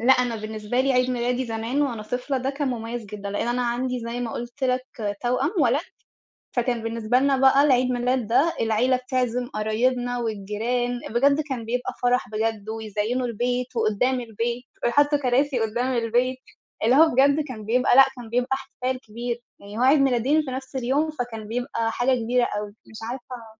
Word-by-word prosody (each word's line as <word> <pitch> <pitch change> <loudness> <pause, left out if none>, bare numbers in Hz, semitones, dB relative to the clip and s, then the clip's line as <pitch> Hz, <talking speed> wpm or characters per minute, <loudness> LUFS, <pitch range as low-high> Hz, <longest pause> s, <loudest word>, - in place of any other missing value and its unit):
لأ 245 +3 +6
أنا 250 -3 +1
بالنسبة 215 +2 -2
لي 270 +1 +2
عيد 250 0 +2
ميلادي 250 +1 0
زمان 230 +5 -1
وأنا 240 -6 -2
طفلة 250 +5 -2
ده 260 +2 -1
كان 280 0 -2
مميز 235 -1 -4
جدًا، 200 -1 -6
لأن 205 +3 -2
أنا 245 +1 0
عندي 250 +1 -1
زي 235 +1 -4
ما 235 -2 -3
قلت 240 +3 -5
لك 255 0 +1 0.4
توأم 250 +7 +1
ولد، 265 +1 +3 0.8
فكان 240 -1 0
بالنسبة 225 +1 +1
لنا 275 +1 +3
بقى 270 +1 +5
العيد 255 -3 +3
ميلاد 250 -1 0
ده 280 +9 +3
العيلة 230 +3 +2
بتعزم 250 -1 -1
قرايبنا 245 +3 0
والجيران، 235 +3 -2
بجد 280 +5 +3
كان 255 -4 -3
بيبقى 245 +2 -2
فرَح 245 -2 +2
بجد، 215 0 -2
ويزيّنوا 220 +3 -2
البيت 245 +2 -2
وقدّام 230 +4 +1
البيت 235 +1 -3 0.2
ويحطوا 290 +4 +3
كراسي 265 +1 +1
قدّام 240 +4 0
البيت، 240 +3 +1 0.5
اللي 245 +4 +5
هو 320 +2 +7
بجد 280 +3 +4
كان 220 -5 -7
بيبقى 245 +3 +3
لأ 270 - +10
كان 240 -2 -9
بيبقى 245 +3 0
احتفال 260 -1 -4
كبير، 235 +1 -5 0.2
يعني 205 +2 -9
هو - - +1
عيد 270 +4 +6
ميلادين 270 +3 +3
في 280 - -6
نفس 265 +1 -6
اليوم، 270 +5 +1
فكان 240 -7 -5
بيبقى 230 -1 -2
حاجة 250 +3 +2
كبيرة 245 +2 +2
أوي، 210 -2 -3 0.2
مش 220 - -11
عارفة 245 -2 -8
245 Hz, 180 wpm, -24 LUFS, 225-260 Hz, 0.8 s, لأ